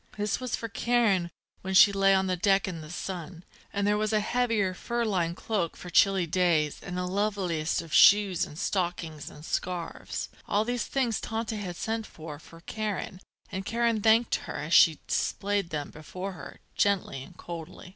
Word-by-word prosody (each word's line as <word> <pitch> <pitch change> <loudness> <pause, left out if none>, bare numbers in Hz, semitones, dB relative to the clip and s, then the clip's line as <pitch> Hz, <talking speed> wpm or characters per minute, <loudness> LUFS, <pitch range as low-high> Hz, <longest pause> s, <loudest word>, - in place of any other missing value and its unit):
This 210 0 -1
was 255 -2 -2
for 230 - -5
Karen 220 -5 +1 0.3
when 190 0 -3
she 200 - +9
lay 195 0 +4
on 190 0 +2
deck 195 +2 +2
in 170 -4 -5
the 155 - -10
sun. 175 0 -6 0.3
And 200 0 -1
there 210 0 +2
was 215 0 0
a 215 - +3
heavier 225 -4 +1
fur 235 +5 -2
lined 175 -5 0
cloak 200 -7 -2
for 180 - -9
chilly 195 -1 +4
days 165 -3 +1
and 180 - -6
the 180 - -1
loveliest 180 -5 -1
of 160 -3 -11
shoes 200 -3 +6
and 150 - -7
stockings 170 -5 -2
and 150 +1 -12
scarves. 175 -1 -4 0.2
All 210 +2 +1
these 245 0 -1
things 245 -5 0
Tante 225 0 -3
had 185 -4 -5
sent 225 +3 -3
for 155 -2 -9
for 165 +1 -15
Karen, 210 -2 -4 0.3
and 190 0 -3
Karen 230 +1 0
thanked 225 +2 +4
her, - - -5
as 155 +4 -3
she 160 -4 +7
displayed 200 -2 -1
them 150 -2 -4
before 180 +5 -6
her, 180 - -11
gently 195 -9 +1
and 175 +6 -13
coldly. 170 +1 -8
190 Hz, 180 wpm, -28 LUFS, 170-215 Hz, 0.3 s, she